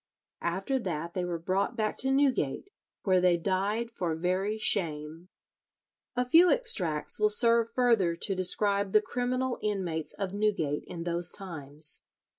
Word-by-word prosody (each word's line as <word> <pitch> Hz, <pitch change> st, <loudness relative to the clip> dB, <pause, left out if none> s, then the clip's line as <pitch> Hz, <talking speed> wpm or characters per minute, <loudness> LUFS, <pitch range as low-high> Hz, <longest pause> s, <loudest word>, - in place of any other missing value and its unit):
After 195 Hz, +10 st, -1 dB
that 170 Hz, -5 st, -4 dB
they 180 Hz, -, -2 dB
were 175 Hz, -1 st, -3 dB
brought 190 Hz, +7 st, -1 dB
back 215 Hz, -2 st, -1 dB
to 265 Hz, -, -1 dB
Newgate, 270 Hz, -, 0 dB, 0.3 s
where 185 Hz, -2 st, +3 dB
they 180 Hz, -1 st, +3 dB
died 200 Hz, +6 st, -1 dB
for 175 Hz, -7 st, -3 dB
very 185 Hz, +5 st, -1 dB
shame. 165 Hz, -4 st, -2 dB, 0.9 s
A 250 Hz, -, 0 dB
few 335 Hz, +7 st, +6 dB
extracts 185 Hz, -, +1 dB
will 210 Hz, 0 st, +3 dB
serve 230 Hz, +1 st, +4 dB
further 230 Hz, -9 st, +2 dB
to 195 Hz, -, -2 dB
describe 200 Hz, +2 st, +1 dB
the 215 Hz, -, +6 dB
criminal 250 Hz, +2 st, -2 dB
inmates 185 Hz, -7 st, -3 dB
of 195 Hz, -2 st, -4 dB
Newgate 200 Hz, -9 st, -1 dB
in 165 Hz, -1 st, -7 dB
those 170 Hz, 0 st, +3 dB
times. 150 Hz, -6 st, -3 dB
195 Hz, 145 wpm, -29 LUFS, 170-230 Hz, 0.9 s, few